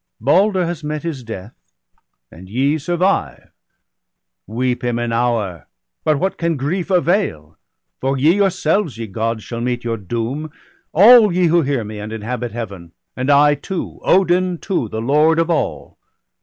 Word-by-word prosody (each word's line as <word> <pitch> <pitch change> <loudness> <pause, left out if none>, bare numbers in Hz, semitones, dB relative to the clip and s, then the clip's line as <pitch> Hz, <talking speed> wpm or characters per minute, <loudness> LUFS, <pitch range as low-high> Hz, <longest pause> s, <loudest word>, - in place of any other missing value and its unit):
Balder 185 - +3
has 170 -2 -5
met 150 +1 -4
his 160 -6 -4
death, 110 -1 -8 0.8
and 95 +3 -13
ye 140 +8 +1
survive 175 +6 -1 0.5
— - - -60
Weep 125 0 0
him 120 -1 -1
an 120 -1 -2
hour, 115 -7 -1 0.4
but 155 -2 +2
what 190 +6 -2
can 170 -2 0
grief 170 +7 -2
avail? 175 - 0 0.4
For 135 +1 -1
ye 150 +6 +4
yourselves, 190 - +1
ye 115 - -4
Gods, 110 +2 -3
shall 115 -1 -6
meet 125 0 -2
your 115 -1 -2
doom. 120 - -4 0.4
All 215 +3 +7
ye 180 +1 +2
who 170 +1 +4
hear 135 -5 -1
me, 105 0 -7
and 105 +1 -6
inhabit 115 +2 -4
Heaven, 100 -7 -7 0.2
And 130 +2 -2
I 145 +1 +5
too, 185 +5 -5
Odin 180 -1 +2
too, 165 - -2
the 110 - -4
Lord 150 +6 +3
of 165 +1 +1
all. 165 - -3
140 Hz, 160 wpm, -19 LUFS, 115-175 Hz, 0.8 s, All